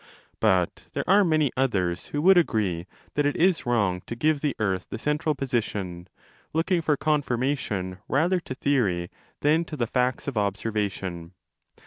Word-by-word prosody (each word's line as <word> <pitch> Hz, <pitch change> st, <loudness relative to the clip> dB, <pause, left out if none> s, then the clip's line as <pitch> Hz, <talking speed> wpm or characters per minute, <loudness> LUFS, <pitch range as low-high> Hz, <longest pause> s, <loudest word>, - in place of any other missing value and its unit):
But 95 Hz, -5 st, +1 dB
there -, -, -3 dB
are 200 Hz, +2 st, +6 dB
many 155 Hz, -6 st, +2 dB
others 95 Hz, -10 st, 0 dB
who 145 Hz, +1 st, -3 dB
would 190 Hz, +2 st, +7 dB
agree 100 Hz, -, +1 dB, 0.3 s
that 145 Hz, 0 st, +2 dB
it 145 Hz, -, -1 dB
is 175 Hz, -5 st, +2 dB
wrong 100 Hz, -7 st, +1 dB
to 115 Hz, -, -4 dB
give 150 Hz, +4 st, +1 dB
the 145 Hz, -2 st, 0 dB
earth 95 Hz, -3 st, -1 dB
the -, -, -4 dB
central 150 Hz, +4 st, 0 dB
30 -, -, -27 dB
position, 100 Hz, -9 st, -2 dB, 0.5 s
looking 170 Hz, +2 st, +1 dB
for 150 Hz, -2 st, +1 dB
confirmation 130 Hz, -10 st, -1 dB
rather 175 Hz, +6 st, +2 dB
to 130 Hz, -6 st, -7 dB
theory 105 Hz, -12 st, 0 dB, 0.3 s
than 155 Hz, +3 st, +3 dB
to 155 Hz, -, -7 dB
the 120 Hz, -, +1 dB
facts 125 Hz, +3 st, 0 dB
of 130 Hz, -6 st, -1 dB
observation. 100 Hz, -4 st, -2 dB
125 Hz, 160 wpm, -26 LUFS, 95-150 Hz, 0.5 s, would